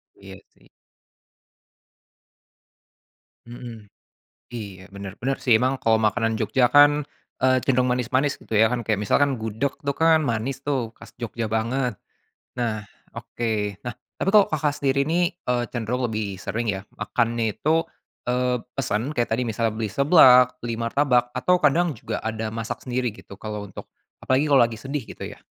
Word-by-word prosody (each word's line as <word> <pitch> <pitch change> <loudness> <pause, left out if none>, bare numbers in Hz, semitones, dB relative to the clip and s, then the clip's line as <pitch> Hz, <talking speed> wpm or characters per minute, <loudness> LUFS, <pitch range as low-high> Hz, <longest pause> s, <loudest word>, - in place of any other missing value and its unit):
Iya, - - -12 0.2
sih. - - -25 2.8
Mhm. 115 -3 -10 0.6
Iya, 100 -6 -8
benar, 100 -1 -8
benar 135 +3 -1
sih, 115 -4 +5
emang 130 +2 +1
kalau 115 -4 +2
makanan 110 +1 +1
Jogja 120 +3 +2
kan, 145 +1 +6 0.4
eee, 130 0 +4
cenderung 125 -1 +1
manis-manis, 130 +3 0
gitu 110 - -5
ya, 110 +2 +5
kan, 125 - 0
kayak 110 -2 0
misalkan 140 +6 +2
gudeg 110 +4 -3
tuh, 140 - 0
kan, 160 +1 +3
manis 130 +2 -2
tuh, 130 -6 -2
khas - - -14
Jogja 115 -2 -4
banget. 115 -1 -1 0.6
Nah, 110 -4 -2 0.2
oke, 105 -3 -3
nah, 125 - -3 0.2
tapi - - -1
kalau 210 -1 +6
Kakak 155 -1 0
sendiri 140 0 +2
nih, 170 +3 0
eee, 125 -1 0
cenderung 120 +1 -2
lebih 105 -4 -4
sering 115 +2 -2
ya, 95 +1 -6
makannya 115 +1 0
itu, 160 +2 +2 0.4
eee, 125 0 0
pesen, 130 -1 -2
kayak 120 -6 0
tadi 125 - -1
misalnya 115 -1 -1
beli 110 -2 -3
seblak, 130 -2 +6
beli 115 -1 -3
martabak, 125 0 +1
atau 180 +8 +2
kadang 165 +3 +3
juga 125 - -5
ada 110 0 -3
masak 110 0 -5
sendiri, 125 -1 -1
gitu, 100 -1 -13
kalau 105 0 -6
untuk - - -11 0.3
apalagi 135 +4 +2
kalau 140 -3 +5
lagi 115 -2 -2
sedih, 135 +2 -4
gitu - - -8
ya? - - -11
120 Hz, 160 wpm, -24 LUFS, 110-135 Hz, 2.8 s, kan